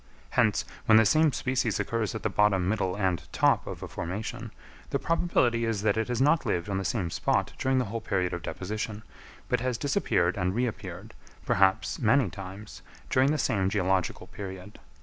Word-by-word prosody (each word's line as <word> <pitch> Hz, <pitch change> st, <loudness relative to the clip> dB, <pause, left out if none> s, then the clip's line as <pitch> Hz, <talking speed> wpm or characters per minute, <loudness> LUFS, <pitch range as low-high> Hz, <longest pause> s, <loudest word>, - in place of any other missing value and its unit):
Hence, -, -, +2 dB, 0.2 s
when 110 Hz, -, +7 dB
the 110 Hz, -, +6 dB
same 155 Hz, +8 st, +4 dB
species 130 Hz, -4 st, -1 dB
occurs 115 Hz, -2 st, -1 dB
at 110 Hz, -, -5 dB
the 110 Hz, -, +1 dB
bottom, 95 Hz, -2 st, +3 dB
middle, 95 Hz, -3 st, 0 dB
and 95 Hz, -6 st, 0 dB
top -, -, +2 dB
of -, -, -6 dB
a -, -, -5 dB
formation, 95 Hz, +6 st, -5 dB, 0.4 s
the -, -, 0 dB
probability 125 Hz, -9 st, +1 dB
is 115 Hz, -3 st, -1 dB
that 110 Hz, -, +3 dB
it 110 Hz, 0 st, -1 dB
has 120 Hz, -1 st, -2 dB
not 150 Hz, +4 st, +4 dB
lived 85 Hz, +3 st, -1 dB
on 95 Hz, -1 st, -1 dB
the -, -, -3 dB
same 95 Hz, -4 st, -1 dB
spot -, -, 0 dB
during 130 Hz, 0 st, +1 dB
the 125 Hz, -, +1 dB
whole 115 Hz, +3 st, -4 dB
period 90 Hz, -3 st, -1 dB
of 85 Hz, -, -4 dB
deposition, 105 Hz, +4 st, -5 dB, 0.4 s
but -, -, +1 dB
has 125 Hz, -1 st, -1 dB
disappeared 105 Hz, -, +1 dB
and 90 Hz, 0 st, 0 dB
reappeared, 120 Hz, -1 st, -4 dB, 0.3 s
perhaps 95 Hz, 0 st, +2 dB
many 120 Hz, -3 st, +3 dB
times, 95 Hz, +2 st, -9 dB, 0.3 s
during 130 Hz, +2 st, +4 dB
the 155 Hz, -, +1 dB
same 95 Hz, -8 st, +1 dB
geological 95 Hz, -2 st, 0 dB
period. 95 Hz, 0 st, -9 dB
105 Hz, 185 wpm, -28 LUFS, 95-120 Hz, 0.4 s, when